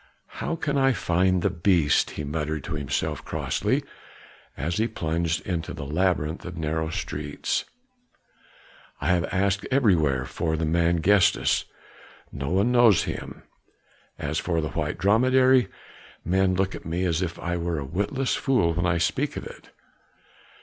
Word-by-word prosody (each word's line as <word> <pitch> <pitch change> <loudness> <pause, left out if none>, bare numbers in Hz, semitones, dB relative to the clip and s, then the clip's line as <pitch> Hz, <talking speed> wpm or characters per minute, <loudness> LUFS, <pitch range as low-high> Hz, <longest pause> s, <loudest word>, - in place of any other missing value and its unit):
"How 165 - -1
can 145 -3 -1
I 135 0 +4
find 90 -2 +1
the 100 - +2
beast?" 85 -4 +2
he 75 - -3
muttered 75 0 -3
to 85 - -5
himself 70 -2 -2
crossly, - - -1 0.7
as 85 +5 -2
he 110 +1 +2
plunged 85 -5 -2
into 85 -3 -3
the 70 - -6
labyrinth 80 0 0
of 90 -1 -7
narrow 80 0 -1
streets. 75 -2 -3 1.3
"I - - -1
have 90 -2 +2
asked 100 +1 0
everywhere 80 - +2
for 80 +3 -2
the 80 - -1
man 85 +1 +2
Gestas, 100 -1 +3 0.7
no 70 0 -4
one 100 +7 +2
knows 120 -6 +5
him; - - -6 0.7
as 75 +3 -2
for 85 -2 -1
the 75 - -2
white - - -3
dromedary, 130 +5 +4 0.6
men 95 +1 +2
look 95 +1 0
at - - -8
me 85 +3 -2
as 85 -1 0
if 85 -2 -3
I 85 0 -3
were 85 -1 -2
a 70 - -3
witless 105 - -1
fool 115 -12 +2
when 85 +2 0
I 85 -1 +2
speak 80 0 -1
of - - -6
it. - - -12
85 Hz, 155 wpm, -25 LUFS, 80-100 Hz, 1.3 s, knows